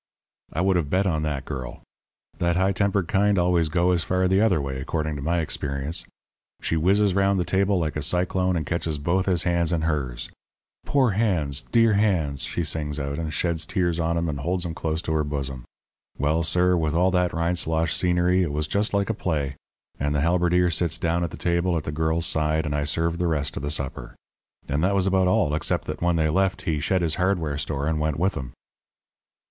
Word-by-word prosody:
"I 80 - -1
would 95 0 +3
have 75 -5 -1
bet 95 +5 +1
on 80 -5 0
that 75 -3 -3
girl. 65 -4 -6 0.6
That 85 0 +1
high 95 +2 +2
tempered 100 -2 0
kind 100 +2 +2
always 85 -2 +2
go 90 +2 +2
as 85 -2 +2
far 95 +1 +1
the 95 +2 +3
other 100 -7 +3
way, 70 -2 -4
according 75 +2 -2
to - - -6
my 85 +4 0
experience. 75 +2 -2 0.5
She - - -1
whizzes 95 +5 +3
round 100 +1 +2
the 90 - 0
table 100 +1 +1
like 80 -3 -1
a 75 - -2
cyclone 90 +3 +1
and 80 -3 -2
catches 80 -1 -2
both 85 +6 0
his 90 -3 +1
hands 85 -2 +1
in 80 -2 0
hers. 70 -7 -2 0.6
'Poor 130 -5 +3
hands 90 -10 0
dear 115 -2 +4
hands,' 90 -10 +1
she 85 - -2
sings 75 -2 -2
out, 70 +1 -3
and 80 -2 -3
sheds 80 +2 -1
tears 85 -3 0
on 85 0 0
'em 85 0 0
and 75 -3 -3
holds 90 +5 -1
'em 85 - -3
close 80 0 -2
to 80 - -2
her 75 -1 +1
bosom. 70 -4 -4 0.5
Well, 75 +4 +1
sir, 90 +2 +2
with 80 -2 0
all 90 +2 +3
that 90 -1 +1
Rindslosh 85 -1 0
scenery 90 +1 +2
it 85 -5 0
was 75 +1 -1
just 100 +6 0
like 100 +2 +1
a - - -1
play. 75 -8 -2 0.4
And 75 +1 0
the 70 - +1
halberdier 90 +2 +2
sits 85 0 0
down 85 0 0
at 85 - -1
the - - -9
table 85 0 +1
at 80 - -3
the - - -4
girl's 80 +2 0
side, 80 +1 0
and 75 - -2
I 75 0 0
served 85 +2 0
the 90 - +1
rest 75 -3 -1
of - - -4
the 70 - -3
supper. 70 -5 -4 0.5
And 75 +4 -1
that 100 +2 +2
was 95 -1 +2
about 95 -1 +2
all, 80 -5 +2
except 75 - -1
that - - -5
when 85 0 +2
they 80 -1 +2
left 95 +3 0
he 80 -4 -1
shed 90 +5 0
his 80 -2 0
hardware 85 -6 0
store 70 -2 -2
and 80 0 0
went 75 -1 -1
with 95 +5 +1
'em." 65 -3 -6
85 Hz, 220 wpm, -24 LUFS, 75-90 Hz, 0.6 s, dear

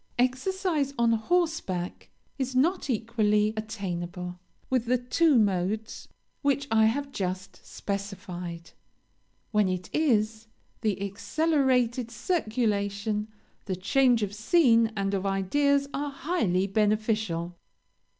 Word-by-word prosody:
"Exercise 280 +3 0
on 235 -1 +3
horseback 230 - -1 0.3
is 260 -1 -2
not 325 +4 +2
equally 215 -2 +1
attainable 180 -5 -5 0.3
with 255 -2 +1
the 250 +2 +2
two 270 +4 +3
modes 205 +1 0 0.3
which 280 0 +1
I 220 0 +5
have 275 +5 0
just 185 -3 -4
specified; 180 -4 -6 0.8
when 210 -3 +3
it 185 -1 -4
is, 225 -7 +1 0.3
the 215 -4 0
accelerated 250 +2 +1
circulation, 215 - -1 0.4
the 190 - -2
change 240 +5 +3
of 205 -1 -3
scene 230 0 +4
and 195 0 -1
of 195 0 -1
ideas, 280 +9 +2
are 290 +1 -2
highly 275 - 0
beneficial. 210 -4 0
220 Hz, 105 wpm, -27 LUFS, 195-265 Hz, 0.8 s, I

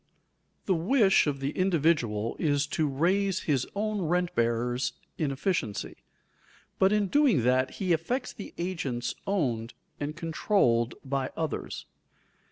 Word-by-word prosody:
_ - - -41
The 190 - +2
wish 195 - +4
of 140 -2 -2
the 135 +1 -1
individual 150 - +1
is 145 -2 +2
to 155 - +2
raise 185 +7 +1
his 135 -5 0
own 210 0 -1
rent 175 +1 0
bearers 120 +1 0 0.3
in 155 - +1
efficiency, 135 - -2 0.8
but 190 +1 +5
in 210 -1 +3
doing 245 - +3
that 130 +1 +2
he 185 -3 +1
affects 240 - -2
the 200 - -8
agents 145 -9 -2
owned 125 - -1 0.2
and 150 +1 -3
controlled 160 - +1
by 135 -1 -1
others. 160 -2 -3
155 Hz, 135 wpm, -28 LUFS, 130-190 Hz, 0.8 s, but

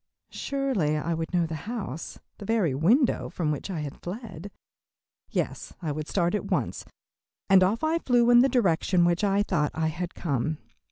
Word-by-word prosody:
Surely 260 - -1
I 165 +3 -1
would 165 0 -3
know 175 -2 +2
the 160 - -5 0.2
house, 195 - -5 0.2
the 205 - -7
very 205 -9 +1
window 225 - +2
from 155 -4 -1
which 150 - -4
I 170 -5 -3
had 145 -2 -7
fled. 195 -2 -7 0.8
Yes, - - -3
I 160 -4 -3
would 155 +1 -4
start 175 -2 +1
at 210 - -2
once, - - -1 0.7
and 190 -1 +8
off 210 +8 +1
I 320 +2 +2
flew 245 -4 +3
in 240 - +8
the 265 +2 +5
direction 185 -6 +2
which 175 +3 +1
I 200 0 +3
thought 155 -8 0
I 160 0 0
had 175 +2 -5
come. 155 -1 -1
180 Hz, 180 wpm, -27 LUFS, 160-225 Hz, 0.8 s, and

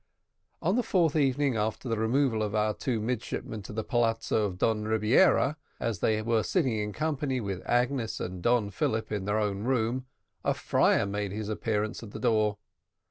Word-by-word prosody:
On 185 +5 +2
the 250 - +3
fourth 175 -9 +2
evening 140 -2 +2
after 110 +4 -2
the 115 -2 -1
removal 115 0 +2
of 105 0 -1
our 105 0 +2
two 120 -1 -2
midshipmen 110 -1 -3
to 95 - -9
the 110 +1 -3
palazzo 115 -3 +1
of 95 -3 -4
Don 105 +2 +1
Rebiera, 115 - +3 0.2
as 115 -6 -2
they 110 +3 +2
were 115 0 +2
sitting 135 - +1
in 105 0 -2
company 145 -1 -1
with 100 -5 -4
Agnes 120 -1 0
and 90 0 -5
Don 115 -1 +2
Philip 110 +3 -1
in 100 -3 -2
their 105 +1 +1
own 100 -2 -1
room, 125 +1 0 0.4
a - - +1
friar - - +2
made 100 0 -3
his 105 +1 -4
appearance 110 -1 -2
at 110 -3 -10
the - - -6
door. 110 -3 +2
110 Hz, 185 wpm, -28 LUFS, 105-125 Hz, 0.4 s, the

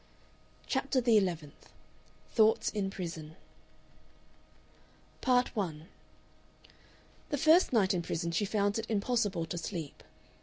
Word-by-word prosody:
CHAPTER 265 0 0
THE 240 -2 +3
ELEVENTH 165 -6 -4 0.6
THOUGHTS 220 -1 +4
IN 200 -3 -2
PRISON 165 -5 -7 1.9
Part 250 -1 +2
1 165 -5 -4 1.4
The 290 - -1
first 320 +5 +5
night 210 -5 +3
in 180 - 0
prison 170 0 -3
she 170 - 0
found 205 0 0
it 225 - -6
impossible 205 -5 0
to 170 +1 -5
sleep. 165 -3 -6
200 Hz, 110 wpm, -31 LUFS, 170-230 Hz, 1.9 s, first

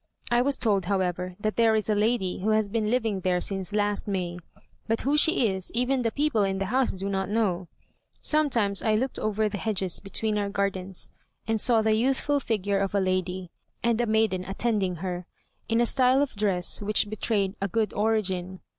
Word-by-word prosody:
I 240 0 +4
was 275 +1 0
told, 200 -6 +2
however, 180 -1 -1
that 215 +1 -2
there 225 -1 +4
is 215 - 0
a 215 - +2
lady 210 -3 0
who 205 +4 -1
has 215 -1 +2
been 215 0 -1
living 225 -5 0
there 180 -1 +1
since 195 +1 -1
last 205 0 0
May, 180 -3 -2 0.5
but 225 0 0
who 280 +3 +1
she 300 -4 +4
is 190 -2 -3
even 250 +2 +1
the 230 - +1
people 290 -5 +1
in 195 -1 0
the 195 - -1
house 260 -1 +2
do 190 +1 -5
not 190 -1 -1
know. 195 -5 0 0.5
Sometimes 240 -10 +1
I 215 -1 +2
looked 255 +5 -1
over 215 0 0
the 205 -1 -4
hedges 195 -5 -1
between 210 +2 -1
our 200 -1 -1
gardens, 195 -2 -2 0.4
and 220 -1 0
saw 230 -3 +3
the 220 0 +3
youthful 270 +5 +1
figure 205 -5 -1
of 195 0 -1
a - - +4
lady, 185 -1 -1 0.3
and 235 0 +2
a 240 - 0
maiden 215 -4 +1
attending 195 -2 -1
her, 180 -1 -4 0.4
in 225 0 +2
a 240 - +4
style 260 +2 +3
of 280 - -5
dress 195 -4 0
which 210 +1 +2
betrayed 200 -2 0
a 195 - +1
good 215 +1 -1
origin. 190 -4 -1
210 Hz, 200 wpm, -26 LUFS, 190-225 Hz, 0.5 s, I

